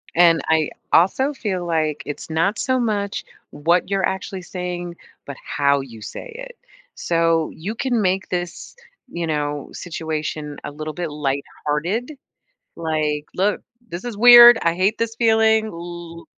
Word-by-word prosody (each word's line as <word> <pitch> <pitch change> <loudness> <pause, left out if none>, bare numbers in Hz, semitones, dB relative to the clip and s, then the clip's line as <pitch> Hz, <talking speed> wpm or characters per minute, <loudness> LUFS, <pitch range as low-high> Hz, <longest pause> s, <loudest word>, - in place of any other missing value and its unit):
And 170 -1 +5
I 160 -2 +2 0.2
also 260 - +3
feel 190 -9 -3
like 155 -3 -1
it's 145 - -7
not 165 +7 +1
so 260 -1 +1
much 205 -4 -1 0.3
what 170 +5 +1
you're 195 -2 +1
actually 190 0 -4
saying, 175 -1 -5 0.3
but 140 - -7
how 140 -1 +1
you 115 -5 -11
say 475 - -8
it. - - -9 0.4
So, 165 -1 +1
you 195 +8 -5
can 245 -2 0
make 190 0 0
this, 175 -1 -5 0.3
you 170 -7 -4
know, 145 -2 -2
situation 155 -3 -5
a - - -6
little 155 +1 -6
bit 175 -2 -3
lighthearted, 150 - -2 0.6
like, 155 -2 -2
"Look, 200 +3 +1 0.3
this 175 +3 -7
is 240 -3 -5
weird, 240 +1 +10
I 170 0 +2
hate 195 +5 +1
this 230 0 -2
feeling, 220 -1 +3
L 170 -3 -8
175 Hz, 145 wpm, -21 LUFS, 155-210 Hz, 0.6 s, weird